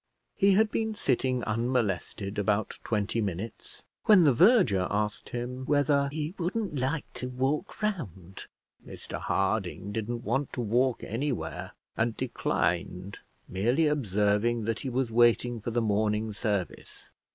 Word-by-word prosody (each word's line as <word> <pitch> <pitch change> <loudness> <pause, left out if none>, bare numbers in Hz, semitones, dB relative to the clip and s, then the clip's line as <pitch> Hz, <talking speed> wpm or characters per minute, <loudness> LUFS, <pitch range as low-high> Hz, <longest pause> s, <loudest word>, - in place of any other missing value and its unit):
He 200 -1 +4
had 215 +2 +3
been 220 -1 -1
sitting 130 - 0
unmolested 110 -3 -1
about 105 +1 0
twenty 110 +1 -1
minutes 100 +2 -5 0.2
when 205 -5 +7
the 145 -4 +5
verger 125 - +5
asked 105 +1 -2
him 125 +2 -4
whether 145 -1 +3
he 155 +2 -3
wouldn't 180 -3 -2
like 135 +4 -1
to 125 - -4
walk 135 +11 -2
round. 95 - -4 0.4
Mr - - -8
Harding 100 - -1
didn't 115 +3 -3
want 135 +5 -1
to 125 - -2
walk 120 +3 +1
anywhere, 105 - -3 0.2
and 115 0 0
declined, 90 -5 -1 0.3
merely 120 - +1
observing 110 -4 +1
that 115 0 -1
he 135 - -4
was 125 -1 -1
waiting 120 0 +3
for 110 - -3
the 120 0 0
morning 105 +1 0
service. 100 -4 -4
120 Hz, 135 wpm, -28 LUFS, 105-140 Hz, 0.4 s, when